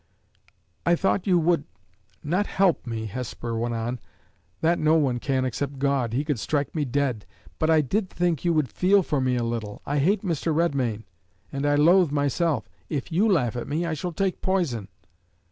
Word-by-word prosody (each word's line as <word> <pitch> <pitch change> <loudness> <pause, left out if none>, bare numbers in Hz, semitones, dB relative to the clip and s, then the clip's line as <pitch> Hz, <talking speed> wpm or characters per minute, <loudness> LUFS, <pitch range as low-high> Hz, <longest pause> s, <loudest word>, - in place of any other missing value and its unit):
"I 175 - +4
thought 195 +2 0
you 180 -2 +4
would 170 -2 +2 0.6
not 180 +7 0
help 190 -9 +1
me," 115 -1 -3
Hesper 115 +1 -5
went 115 +1 -1
on, 120 +2 -3 0.3
" 85 +1 -40
that 170 +2 +2
no 155 +1 +4
one 135 -6 +2
can 130 0 0
except 135 +3 -3
God 135 -4 0
he 135 +6 -1
could 145 -6 -1
strike 145 +5 -1
me 155 -3 -1
dead; 130 -4 -1 0.3
but 160 - +1
I 160 -1 +5
did 190 - -1
think 175 -5 -1
you 175 - +2
would 155 -4 +2
feel 195 +1 +4
for 145 -4 -1
me 130 -1 +1
a 120 - 0
little. 115 -3 -4
I 145 +1 0
hate 190 +8 +2
Mr. 165 -3 -1
Redmain, 130 -10 0 0.5
and 140 +1 -1
I 145 - +3
loathe 170 +2 +5
myself. 145 +2 0 0.2
If 145 -1 -3
you 200 +7 +3
laugh 125 - +1
at 120 - -4
me, 160 +4 -1
I 170 - -1
shall 175 +4 -3
take 190 +2 -1
poison." 165 - 0
145 Hz, 195 wpm, -25 LUFS, 125-170 Hz, 0.6 s, I